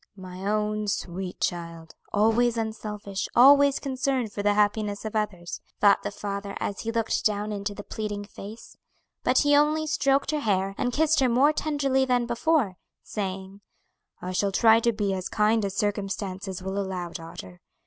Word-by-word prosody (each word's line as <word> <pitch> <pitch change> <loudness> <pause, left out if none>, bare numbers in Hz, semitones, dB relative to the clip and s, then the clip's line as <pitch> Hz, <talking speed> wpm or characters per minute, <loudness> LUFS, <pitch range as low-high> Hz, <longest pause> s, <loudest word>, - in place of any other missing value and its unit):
"My 185 +1 -7
own 210 0 -1
sweet 185 -1 -4
child! 170 -1 -4 0.2
always 225 +3 +3
unselfish, 210 -3 -4
always 280 +2 +7
concerned 260 -4 -1
for 205 - -3
the 205 0 +2
happiness 210 0 0
of 220 - -5
others," 185 -6 -3 0.2
thought 205 -1 +5
the - - -3
father 200 -1 -5
as 200 - -3
he 225 - -3
looked 230 -1 0
down 210 0 0
into 205 0 -4
the 205 - -7
pleading 205 -2 -5
face; 205 +2 -11 0.5
but - - +2
he 290 -1 +4
only 305 +2 +3
stroked 275 -2 +1
her 305 - 0
hair, 195 -5 0
and 245 - -1
kissed 310 +3 +2
her 260 -2 +3
more 270 +6 +4
tenderly 285 -4 +1
than 250 -2 +1
before, 235 - +1 0.3
saying, 195 -1 -5 0.6
"I 180 - -5
shall 195 +2 0
try 225 +3 +5
to 235 +1 +2
be 205 -3 -1
as 185 -1 -4
kind 215 +1 +2
as 195 -1 -3
circumstances 195 -2 -3
will 190 +1 -3
allow, 185 -3 -3
daughter. 165 - -9
210 Hz, 170 wpm, -26 LUFS, 195-240 Hz, 0.6 s, always